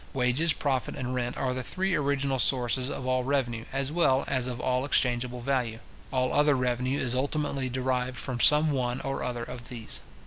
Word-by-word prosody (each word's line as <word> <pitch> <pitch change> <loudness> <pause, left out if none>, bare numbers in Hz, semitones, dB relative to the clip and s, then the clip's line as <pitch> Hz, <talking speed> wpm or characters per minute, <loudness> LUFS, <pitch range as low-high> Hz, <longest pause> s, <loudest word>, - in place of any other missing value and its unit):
Wages, 130 +6 +2
profit, 135 -4 -1
and 130 -2 -4
rent, 125 -1 -2
are 130 -1 -1
the 130 - -3
three 185 +9 -1
original 140 -3 0
sources 125 0 +3
of 130 - -5
all 130 0 +1
revenue, 125 -4 -1
as 135 +1 -1
well 140 -5 +3
as 130 -2 0
of 125 -1 -4
all 125 0 0
exchangeable 125 -3 0
value. 125 -3 -1 0.3
All 130 -1 0
other 145 -1 +4
revenue 125 +1 0
is 125 -3 0
ultimately 140 0 -1
derived 125 0 -1
from 125 0 -4
some 150 +3 +6
one 125 -2 -1
or 135 0 -3
other 120 -1 -3
of 120 0 -8
these. 115 -3 -5
130 Hz, 185 wpm, -28 LUFS, 125-135 Hz, 0.3 s, some